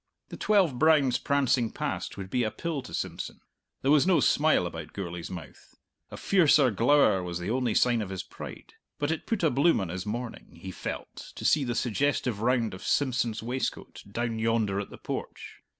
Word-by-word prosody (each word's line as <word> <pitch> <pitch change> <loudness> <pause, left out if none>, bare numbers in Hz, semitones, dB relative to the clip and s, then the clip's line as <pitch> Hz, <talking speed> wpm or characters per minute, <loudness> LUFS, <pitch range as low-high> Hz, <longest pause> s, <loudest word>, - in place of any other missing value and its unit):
The - - -7
twelve 185 -12 +2
browns 145 -6 +4
prancing 130 -4 +1
past - - -4
would 95 -1 -7
be 125 - +1
a 110 - 0
pill 160 +5 -4
to 130 - -12
Simpson! - - -4 0.4
There 135 - +3
was 150 +3 +5
no 185 -3 +5
smile 155 - +3
about 80 -2 -7
Gourlay's 90 -3 -5
mouth 80 -8 -10 0.3
a - - -8
fiercer 155 -8 +4
glower 115 -2 +4
was 90 -1 -4
the 90 +4 -3
only 125 -3 0
sign 120 -2 +3
of 100 - -4
his 95 -2 -4
pride - - -10 0.2
but 145 +1 -1
it 160 - -4
put 220 -6 -1
a 160 - +4
bloom 140 +5 +3
on 95 -4 -3
his 90 +3 -5
morning, 115 -5 -6
he 95 +2 -7
felt, - - -7
to - - -7
see 150 - +4
the 120 -2 -2
suggestive 125 -3 0
round 120 -2 +1
of 95 - -9
Simpson's 120 -2 0
waistcoat, 125 +3 -4
down 115 +1 -2
yonder 110 -3 +1
at 100 - -5
the - - -11
porch. - - -6
120 Hz, 195 wpm, -28 LUFS, 100-140 Hz, 0.4 s, was